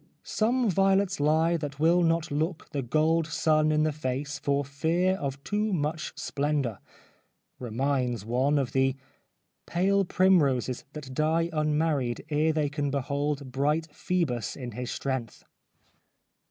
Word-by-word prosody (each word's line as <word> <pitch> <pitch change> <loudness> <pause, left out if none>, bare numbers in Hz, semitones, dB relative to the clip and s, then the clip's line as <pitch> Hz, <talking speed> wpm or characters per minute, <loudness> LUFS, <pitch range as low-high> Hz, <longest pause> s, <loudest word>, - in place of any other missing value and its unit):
' - - -47
Some 240 +3 +1
violets 195 0 +2
lie 160 +3 +3
That 145 -3 -6
will 170 +3 +4
not 165 -2 +1
look 155 +4 -2
the 140 - -2
gold 155 +5 +1
sun 155 -1 +2
in 155 0 +2
the 155 - +2
face 140 -1 -3
For 140 0 0
fear 165 +7 +1
of 140 -2 -4
too 210 +1 -1
much 155 -2 -2
splendour 140 -6 -1 0.3
' - - -38
— - - -51
reminds 125 -2 -1
one 130 +6 +1
of 135 -4 0
the 135 0 +2 0.4
' - - -51 0.3
Pale 195 +3 +2
primroses 145 -10 +2
That 140 -4 -8
die 160 +4 +1
unmarried 150 -5 0
ere 155 +1 +2
they 155 -2 0
can 145 0 -2
behold 140 0 -2
Bright 150 +5 0
Phoebus 145 - -1
in 125 -3 -6
his 125 +2 -5
strength.' 130 -5 -4
150 Hz, 150 wpm, -28 LUFS, 135-165 Hz, 0.4 s, will